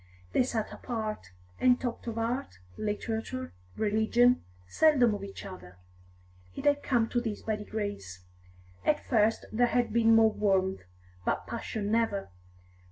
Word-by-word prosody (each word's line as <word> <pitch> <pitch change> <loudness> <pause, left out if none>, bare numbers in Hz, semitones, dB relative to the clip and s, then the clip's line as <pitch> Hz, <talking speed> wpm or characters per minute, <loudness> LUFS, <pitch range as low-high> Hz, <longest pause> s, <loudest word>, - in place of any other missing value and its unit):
They - - +4
sat 235 -4 -1
apart, 215 - -4 0.3
and 250 -1 +4
talked 240 -1 -4
of 230 -1 -3
art, 230 - -2 0.2
literature, 220 +4 -3 0.2
religion, 220 +4 +3 0.2
seldom 255 - +4
of 200 -1 -5
each 200 0 -8
other. 95 - -10 0.8
It - - -6
had 285 0 +4
come 240 -4 +2
to 240 - 0
this 220 -4 -4
by 220 -1 -1
degrees; 205 - -5 0.6
at 300 - +2
first 225 -2 +2
there 245 +2 +3
had 245 0 0
been 225 -1 +5
more 225 -1 +6
warmth, 190 - +1 0.4
but - - -1
passion 220 -3 -4
never. 220 - 0
225 Hz, 140 wpm, -29 LUFS, 205-240 Hz, 0.8 s, more